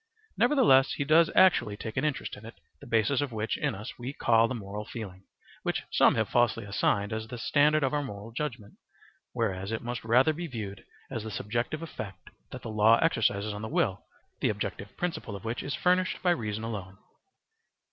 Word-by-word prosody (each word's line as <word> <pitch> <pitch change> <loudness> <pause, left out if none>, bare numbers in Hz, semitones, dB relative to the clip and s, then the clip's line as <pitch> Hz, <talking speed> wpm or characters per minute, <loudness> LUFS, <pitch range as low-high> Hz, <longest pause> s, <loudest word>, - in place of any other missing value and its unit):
Nevertheless 180 - +5
he - - -1
does 160 +3 +5
actually 135 - +4
take 110 0 -6
an 130 - 0
interest 150 -3 -2
in 105 - -13
it, 115 +1 -10 0.2
the 140 - -12
basis 120 +4 +2
of 145 -3 -2
which 110 0 -2
in - - -1
us 105 +6 -8
we 125 +3 -5
call 115 -4 +3
the 130 - -3
moral 105 -1 -6
feeling, 100 -4 -8 0.4
which - - -2
some - - +5
have - - +1
falsely 115 -2 +2
assigned 100 0 0
as 110 0 -4
the 125 - -7
standard 150 +4 +3
of 135 - +1
our 145 - +1
moral 105 -4 -7
judgement, 120 -5 -5 0.5
whereas 100 -4 -2
it 110 - -3
must 120 0 -4
rather 125 +7 +4
be 170 +3 -5
viewed 105 -7 -6 0.3
as 110 - -3
the 110 - -5
subjective 120 +9 -3
effect 100 - -8 0.2
that - - -9
the - - -5
law 110 +2 +5
exercises 110 -9 +1
on 105 - -6
the 110 - -4
will, 95 -5 0 0.4
the - - +1
objective 100 - -4
principle 170 - -3
of 100 - -9
which 115 +2 -2
is 140 - -3
furnished 180 +1 +1
by 180 - +4
reason 110 -8 -2
alone. 100 -4 -5
115 Hz, 200 wpm, -29 LUFS, 105-140 Hz, 0.5 s, Nevertheless